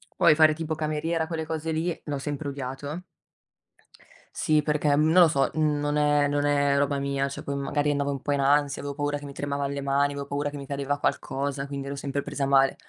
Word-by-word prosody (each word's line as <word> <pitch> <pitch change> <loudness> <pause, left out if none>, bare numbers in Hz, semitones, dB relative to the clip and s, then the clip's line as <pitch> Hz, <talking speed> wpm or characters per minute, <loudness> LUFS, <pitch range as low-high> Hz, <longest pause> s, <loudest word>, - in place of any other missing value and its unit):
Poi 155 - +5
fare 155 0 +6
tipo 160 0 -3
cameriera, 160 +1 -1
quelle 160 -1 -3
cose 160 0 -3
lì, 165 +2 -2
l'ho 145 -2 -3
sempre 145 +1 -4
odiato 140 +5 -5 1.3
Sì, 155 -1 +3
perché 150 -1 +1
non 155 +2 +3
lo 180 -1 +8
so, 135 -2 +2
mhmm, 150 -2 +1
non 145 0 -1
è 145 -1 +3
non 145 0 0
è 145 -1 +2
roba 140 0 +1
mia. 140 0 -1
Cioè 140 - -7
poi 140 - -4
magari 145 +1 0
andavo 140 0 0
un 135 -2 -4
po' 145 - -1
in 140 - 0
ansia, 145 +1 +2
avevo 140 0 -4
paura 145 0 -1
che 145 - -11
mi 140 - -7
tremavan 140 0 -3
le 140 - -3
mani, 140 +1 +2
avevo 140 0 -5
paura 145 +1 -2
che 145 - -8
mi 140 - -7
cadeva 140 0 -2
qualcosa, 140 0 -2
quindi 140 -1 -5
ero 140 - -4
sempre 140 0 -3
presa 145 -1 -3
male. 135 -1 +4
145 Hz, 225 wpm, -26 LUFS, 140-150 Hz, 1.3 s, lo